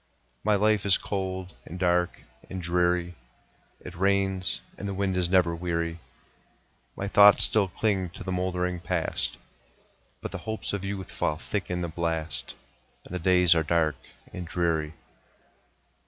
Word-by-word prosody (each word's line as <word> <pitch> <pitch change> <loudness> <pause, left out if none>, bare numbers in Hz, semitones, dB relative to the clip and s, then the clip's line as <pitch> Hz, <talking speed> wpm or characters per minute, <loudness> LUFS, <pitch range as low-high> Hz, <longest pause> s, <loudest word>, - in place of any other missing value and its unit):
My 105 0 +3
life 105 0 +3
is 100 -2 +5
cold, 95 -2 -4
and 90 - -8
dark, 90 -1 +1 0.3
and 95 - -5
dreary; 90 0 +1 0.7
It 90 - -9
rains, 95 0 +1 0.2
and 100 - -6
the 100 - -3
wind 95 -1 0
is 90 -1 +1
never 90 -3 +3
weary; 85 -1 -2 1.0
My 100 - -3
thoughts 100 0 +7
still 105 -3 +3
cling 95 -1 0
to - - -7
the 95 - -4
moldering 90 -1 -1
Past, - - -1 0.8
But - - -6
the - - -4
hopes 110 -1 -3
of 100 -2 -2
youth 95 -1 -4
fall 75 - -1
thick 95 +3 -3
in 90 0 -1
the 85 - -1
blast, 80 -1 -3 0.5
And - - -10
the 90 - -1
days 90 0 +5
are 80 - +2
dark 80 -2 +1 0.4
and 90 -2 -6
dreary. 80 -3 0
90 Hz, 155 wpm, -27 LUFS, 85-95 Hz, 1.0 s, thoughts